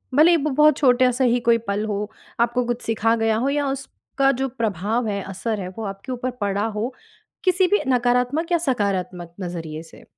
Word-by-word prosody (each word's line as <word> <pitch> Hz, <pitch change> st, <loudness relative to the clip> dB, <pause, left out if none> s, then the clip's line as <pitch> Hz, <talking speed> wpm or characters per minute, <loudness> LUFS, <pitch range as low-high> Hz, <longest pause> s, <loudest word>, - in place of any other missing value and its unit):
भले 310 Hz, +4 st, +7 dB
ही 340 Hz, -, +5 dB
वो 305 Hz, -, +1 dB
बहुत 300 Hz, +1 st, +4 dB
छोटा-सा 255 Hz, -1 st, +3 dB
ही 245 Hz, -1 st, +3 dB
कोई 230 Hz, -, +6 dB
पल 200 Hz, +2 st, -1 dB
हो, 210 Hz, 0 st, -3 dB, 0.3 s
आपको 240 Hz, +1 st, +1 dB
कुछ 240 Hz, 0 st, -2 dB
सिखा 225 Hz, 0 st, +1 dB
गया 225 Hz, -1 st, +1 dB
हो? 255 Hz, +5 st, 0 dB
या 285 Hz, 0 st, 0 dB
उसका 270 Hz, 0 st, -1 dB
जो 270 Hz, -, +1 dB
प्रभाव 225 Hz, -1 st, -1 dB
है, 200 Hz, -1 st, -2 dB
असर 200 Hz, +3 st, -3 dB
है, 180 Hz, -, -5 dB
वो 225 Hz, -, -4 dB
आपके 195 Hz, +5 st, -6 dB
ऊपर 255 Hz, 0 st, -3 dB
पड़ा 200 Hz, +1 st, 0 dB
हो? 235 Hz, +5 st, -2 dB, 0.5 s
किसी 370 Hz, 0 st, +3 dB
भी 410 Hz, +3 st, +2 dB
नकारात्मक 250 Hz, +6 st, +1 dB
या 345 Hz, -, +4 dB
सकारात्मक 195 Hz, -, -2 dB
नज़रिए 165 Hz, -3 st, -5 dB
से? 165 Hz, -, -16 dB
235 Hz, 195 wpm, -22 LUFS, 205-270 Hz, 0.5 s, भले